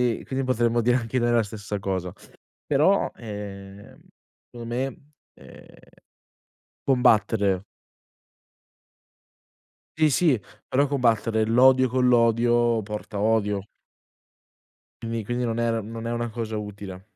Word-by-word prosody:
Quindi 120 -2 0
quindi 135 0 -2
potremmo 120 -2 +1
dire 120 +2 +3
anche 125 +1 -2
noi 120 - +1
la 120 -1 +3
stessa 105 0 -6
cosa, 95 -2 -3 0.5
però, 150 +8 +3
ehm, 100 -2 -9 0.5
secondo 120 -1 -9
me, 130 +1 -2 0.4
eh, - - -16 1.1
combattere. 105 -6 +2 2.3
Sì, 155 -1 +4
sì. 140 -6 +2 0.3
Però, 140 +2 +2
combattere 115 -5 +1
l'odio 130 +3 +5
con 125 +1 +1
l'odio 120 -1 +3
porta 105 0 -6
odio. 105 -2 0 1.4
Quindi 115 -1 -3
quindi 120 +3 -2
non 115 -1 -1
era 115 -1 0
non 115 +2 -7
è - - -2
una 120 0 -2
cosa 110 -1 -5
utile. 100 -2 -7
115 Hz, 115 wpm, -24 LUFS, 105-125 Hz, 2.3 s, l'odio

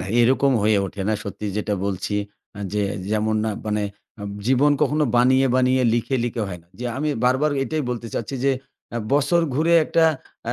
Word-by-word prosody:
না - - -4 0.2
এরকম 135 +3 +4
হয়ে 105 0 +3
ওঠে 95 +1 -6
না। - - +2
সত্যি 105 +1 -5
যেটা 105 0 -1
বলছি 100 +1 -3 0.4
আ - - -6
যে 105 - 0 0.3
যেমন 110 0 +1
না 110 - 0 0.2
মানে 105 0 0 0.4
আব 100 0 -5 0.2
জীবন 135 +3 +4
কখনো 150 +1 +2
বানিয়ে, 130 +2 +4
বানিয়ে 130 0 +3
লিখে, 120 +3 -1
লিখে 120 -1 -3
হয় 90 -2 -6
না। - - -30
যে 125 - -6
আমি 150 +3 -1 0.2
বারবার 130 +5 +3
এটাই 155 +1 -2
বলতে 120 -1 -4
চাচ্ছি 115 +4 -3
যে 140 - +4 0.4
আ - - 0
বছর 145 +5 +3
ঘুরে 160 +4 +2
একটা 165 +1 +3 0.5
আ - - 0
125 Hz, 195 wpm, -22 LUFS, 105-140 Hz, 0.5 s, এরকম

